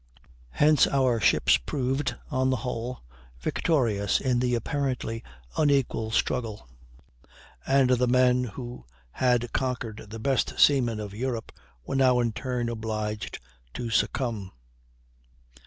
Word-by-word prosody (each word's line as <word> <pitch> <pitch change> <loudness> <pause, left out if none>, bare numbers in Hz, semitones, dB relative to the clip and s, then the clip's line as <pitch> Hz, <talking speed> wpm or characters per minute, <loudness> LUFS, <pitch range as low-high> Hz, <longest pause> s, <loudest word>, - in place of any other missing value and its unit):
Hence 150 - +4
our 130 -4 +2
ships 95 - +4
proved, 135 - -2 0.2
on 130 -1 +1
the 130 - +2
whole, 125 +1 -4 0.4
victorious 110 - +1
in 125 -2 +1
the 125 0 +1
apparently 125 -2 -2 0.4
unequal 135 -6 +2
struggle, 110 - -1 1.0
and 135 -1 +4
the 125 0 +3
men 125 0 +3
who 120 - -8 0.2
had 120 - +1
conquered 120 -5 -3
the 110 - -7
best 130 +3 0
seamen 120 -6 +4
of 105 -2 -6
Europe 120 0 -3 0.3
were - - -4
now 130 -2 +4
in 120 -1 +1
turn 120 +1 -3
obliged 110 -2 -3 0.4
to 120 -1 -4
succumb. 110 -4 0
125 Hz, 120 wpm, -27 LUFS, 115-130 Hz, 1.0 s, Hence